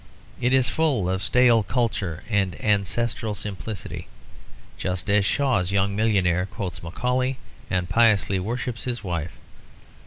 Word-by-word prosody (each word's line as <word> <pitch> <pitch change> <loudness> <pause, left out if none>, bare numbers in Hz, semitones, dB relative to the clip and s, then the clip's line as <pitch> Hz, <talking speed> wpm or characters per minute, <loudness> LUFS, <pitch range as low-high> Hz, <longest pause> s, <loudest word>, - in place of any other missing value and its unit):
It 125 - +2
is 130 -2 +4
full 135 - +1
of 95 +1 -1
stale 120 +3 +4
culture 105 -6 -1
and 100 -5 0
ancestral 105 +1 0
simplicity, 100 +1 -5 0.7
just 95 +2 -2
as 100 -1 +4
Shaw's 125 -10 +1
young 100 0 +1
millionaire 95 -4 +2
quotes 95 -5 -5
Macaulay 125 +9 -1 0.3
and 90 -1 0
piously 105 -1 +3
worships 120 +4 -3
his 120 -2 -3
wife. 85 -3 -3
105 Hz, 125 wpm, -24 LUFS, 95-120 Hz, 0.7 s, is